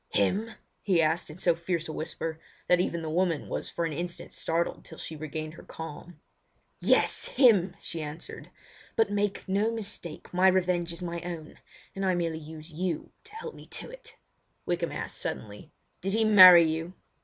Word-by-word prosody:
"Him?" 205 - 0 0.3
he 190 -5 +2
asked, 160 +1 +1
in 155 - -9
so 180 -2 +3
fierce 170 0 -2
a 155 - -5
whisper 160 0 -4 0.3
that 180 - +5
even 170 -2 -1
the - - -4
woman 170 -2 +1
was - - -4
for 170 - -2
an 160 - -2
instant 175 +3 -5
startled 165 +1 -1
till 160 - -12
she 160 - -6
regained 155 +1 -5
her - - -12
calm. 165 +2 -9 0.6
"Yes, - - +2
him!" 225 - +4
she 165 - -4
answered. 150 +2 -8 0.5
"But 225 -2 +2
make 205 -1 -1
no 200 +3 +2
mistake, 205 -9 -4
my 185 +1 +5
revenge 180 -2 +2
is 170 +1 -7
my 170 -1 -4
own; 170 -3 -7 0.4
and 195 - -3
I 185 -1 +2
merely 165 -2 -1
use 155 +1 -10
you 170 0 -3
to 430 -1 -12
help 465 +1 -6
me - - -13
to - - -7
it." - - -12 0.5
Wykham 175 -1 -1
asked - - -5
suddenly: 105 +7 -6 0.3
"Did 195 +2 -2
he 220 0 +3
marry 185 -5 +10
you?" 165 +2 -2
175 Hz, 180 wpm, -28 LUFS, 160-190 Hz, 0.6 s, marry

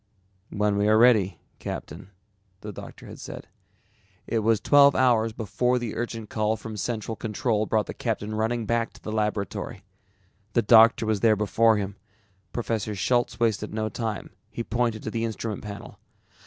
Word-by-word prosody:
"When 105 -1 0
we 100 +1 +2
are 110 0 +5
ready, 110 -5 +4 0.2
Captain," - - -7 0.5
the 105 - -6
doctor - - -10
had - - -10
said. - - -8 0.8
It 115 - 0
was 110 0 +2
twelve 140 +2 +6
hours 115 -3 +3
before 115 +4 0
the 120 -3 -4
urgent 115 -2 -4
call 110 +1 0
from 110 0 -8
Central 110 +1 -3
Control 110 -1 -1
brought 110 -2 +1
the - - -6
captain 105 +1 -3
running 110 +2 -1
back 115 +1 0
to - - -18
the 110 - -5
laboratory. 105 -3 -2 0.7
The 120 - +3
doctor 115 +1 +6
was 110 -2 +1
there 110 0 +4
before 110 +2 +3
him. 100 -1 -4 0.5
Professor 110 -3 -2
Schultz 120 +3 0
wasted 110 -2 0
no 110 0 -1
time, 110 -1 -4 0.2
he 115 +1 -5
pointed 115 -2 -1
to 110 - -4
the 115 0 -2
instrument 110 -1 -3
panel. 100 -1 -9
110 Hz, 165 wpm, -26 LUFS, 105-115 Hz, 0.8 s, twelve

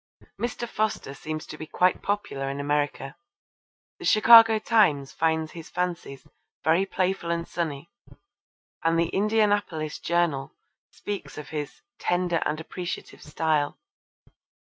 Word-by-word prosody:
Mr. 240 0 -3
Foster 215 -11 -2
seems 155 +2 -6
to 155 - -10
be 155 - -7
quite 180 +3 +2
popular 170 -10 -2
in 140 +1 -4
America. 145 -1 -1 0.8
The - - -7
Chicago 225 0 +8
Times 170 - +2
finds 160 -1 0
his 165 -2 -10
fancies 175 -6 -4 0.4
'very 170 +5 +3
playful 185 -2 -1
and 170 0 -1
sunny,' 160 -3 -4 0.9
and 165 0 +2
the 170 0 +1
Indianapolis 205 -7 0
Journal 160 -5 0 0.3
speaks 190 -10 -6
of 150 -1 -8
his 150 - -6 0.2
'tender 175 -1 0
and 155 - -2
appreciative 175 +2 -6
style.' 150 -1 0
165 Hz, 120 wpm, -26 LUFS, 150-195 Hz, 0.9 s, Chicago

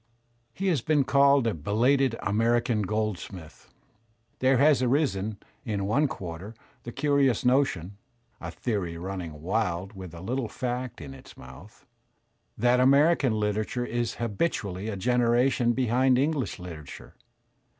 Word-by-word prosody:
He 190 +11 -5
has 165 -6 +1
been 150 -3 +2
called 140 -1 +4
a 115 - +1
"belated" 120 - +1
American 115 +2 +1
Goldsmith. 100 -5 -4 0.7
There 130 0 +3
has 140 -1 +4
arisen 120 -6 0 0.3
in. 105 -6 -2
one 140 +9 +2
quarter 95 0 -7 0.3
the 120 - -8
curious 140 -2 +1
notion 115 - +1 0.4
(a - - -6
theory 95 -8 -3
running 85 -4 -6
wild 95 0 -1
with 95 -4 -9
a - - -9
httle 120 +3 -3
fact 125 -4 -4
in 70 -3 -8
its 65 - -14
mouth) 70 - -14 0.7
that 120 +2 +3
American 140 0 +4
Kterature 110 +3 -1
is 120 -1 -2
habitually 105 - -2
a 105 - -3
generation 120 +2 +2
behind 125 +1 +2
English 140 -4 -1
literature. 80 -7 -10
115 Hz, 130 wpm, -27 LUFS, 95-130 Hz, 0.7 s, called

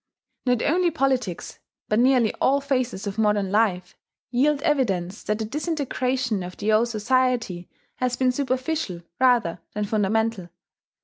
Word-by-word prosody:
Not 245 -2 +2
only 345 +4 +2
politics, 260 - -1 0.3
but 215 - +1
nearly 250 -3 +4
all 275 +2 +4
phases 255 -7 -2
of 200 +1 -4
modern 210 -3 +2
life, 205 -4 +1 0.4
yield 280 +4 +2
evidence 205 - 0
that 210 - -1
the 220 - -3
disintegration 260 - -1
of 180 0 -7
the 215 +1 +1
old 225 +3 +4
society 235 -5 0 0.3
has 250 -1 0
been 255 -1 +3
superficial 255 - -2 0.2
rather 240 -10 +3 0.2
than 210 0 -1
fundamental. 215 -2 0
240 Hz, 135 wpm, -24 LUFS, 210-260 Hz, 0.4 s, nearly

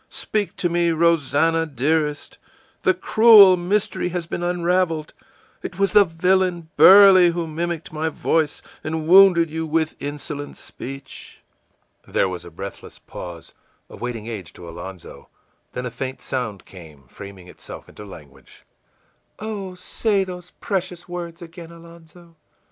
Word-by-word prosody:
Speak 210 -2 -3
to 175 - -1
me, 170 0 +1
Rosannah, 165 0 +2
dearest! 150 +2 -2 0.4
The 375 - +2
cruel 220 - +7
mystery 180 +1 -1
has 175 -1 -4
been 170 - -5
unraveled; 175 -2 -1 0.5
it 175 - -7
was 195 0 +1
the 210 -1 +6
villain 175 0 0
Burley 190 +2 +8
who 170 0 -3
mimicked 165 0 -5
my 160 +1 -2
voice 155 -1 -1 0.2
and 155 0 -4
wounded 180 -3 +6
you 160 0 -4
with 160 0 -1
insolent 145 0 -6
speech!î 135 +1 -10 0.7
There - - +2
was 90 -2 -6
a 85 - -11
breathless 95 +4 -9
pause, 85 -2 -10 0.4
a - - -10
waiting 120 -3 -6
age 105 -8 -7
to 85 - -12
Alonzo; 85 +2 -10 0.4
then 125 - -5
a 125 - -4
faint 130 +2 -6
sound 110 -7 -4
came, 80 -7 -14
framing 95 +7 -12
itself - - -11
into 105 - -12
language: 80 -8 -15 0.7
ìOh, 200 -4 -6
say 200 +2 -1
those 180 -1 -9
precious 185 -3 -4
words 175 -1 -7
again, 165 0 -12
Alonzo! 170 0 -16
165 Hz, 135 wpm, -21 LUFS, 130-180 Hz, 0.7 s, Burley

